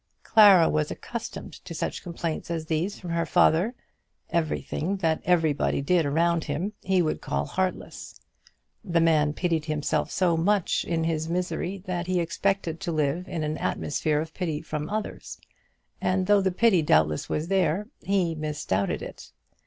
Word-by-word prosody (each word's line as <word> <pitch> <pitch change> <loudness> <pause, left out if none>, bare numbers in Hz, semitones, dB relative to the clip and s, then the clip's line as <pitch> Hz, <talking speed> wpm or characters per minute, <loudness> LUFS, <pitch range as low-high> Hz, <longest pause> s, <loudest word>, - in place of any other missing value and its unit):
Clara 200 -6 +7
was 150 -1 0
accustomed 235 -2 -7
to 175 -2 -8
such - - -3
complaints 170 -2 -4
as 165 -2 -3
these 165 +5 -2
from 175 -3 -6
her 170 0 +1
father. 180 +11 +3 0.6
Everything 170 +3 -1
that 165 -4 0
everybody 160 -5 +2
did 160 +2 +2
around 165 +3 +1
him 165 +9 -3
he 185 -1 +2
would 155 - -2
call 70 +1 -2
heartless. 185 - -4 0.6
The 175 -5 +1
man 155 -3 +3
pitied 165 -2 -1
himself 150 -2 -1
so 175 -3 +2
much 190 +3 +1
in 165 -1 -1
his 160 -1 -1
own 165 - -2
misery, 180 +1 -3
that 175 -1 -3
he 185 -1 +1
expected 175 -1 -1
to 195 -3 -3
live 155 +3 -1
in 165 -2 -3
an 150 0 -2
atmosphere 150 +1 -1
of 160 +1 -5
pity 160 -5 -2
from 150 -1 -4
others; 215 0 -5 0.6
and 185 0 +1
though 205 +1 +4
the 190 - +2
pity 190 -1 +3
doubtless 75 - +2
was 155 +2 -1
there, 190 +1 +1
he 185 -4 +1
misdoubted 150 -11 -2
it. - - -10
170 Hz, 160 wpm, -26 LUFS, 155-185 Hz, 0.6 s, Clara